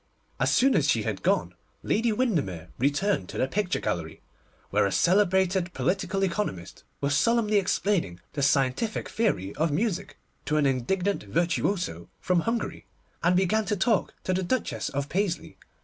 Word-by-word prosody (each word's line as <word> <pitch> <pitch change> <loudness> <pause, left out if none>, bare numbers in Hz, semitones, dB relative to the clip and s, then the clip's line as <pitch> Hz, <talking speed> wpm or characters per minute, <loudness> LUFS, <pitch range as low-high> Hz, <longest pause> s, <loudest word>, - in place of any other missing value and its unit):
As - - +2
soon 265 +1 +4
as - - +2
she - - +2
had - - -3
gone, - - +1 0.3
Lady 225 +1 +1
Windermere 150 - -1
returned 145 - +1
to - - -6
the 130 - +1
picture 185 +4 -1
gallery, 85 -7 -4 0.5
where - - +3
a - - -3
celebrated 190 - +2
political 195 +1 -1
economist 170 - -3 0.2
was 140 0 +1
solemnly 230 +1 +3
explaining 185 - 0
the 145 - -2
scientific 140 - +1
theory 100 - -1
of 160 +2 +2
music 195 +3 -2 0.3
to 150 +2 +1
an 150 - +3
indignant 175 +10 0
virtuoso 170 - -1
from 180 -1 +1
Hungary, 230 +6 -3 0.3
and 175 +2 +3
began 205 +4 +2
to 210 - 0
talk 200 +1 +1
to 185 - 0
the 185 - 0
Duchess 230 +7 -1
of 140 0 -3
Paisley. 185 +1 -2
180 Hz, 155 wpm, -27 LUFS, 140-205 Hz, 0.5 s, soon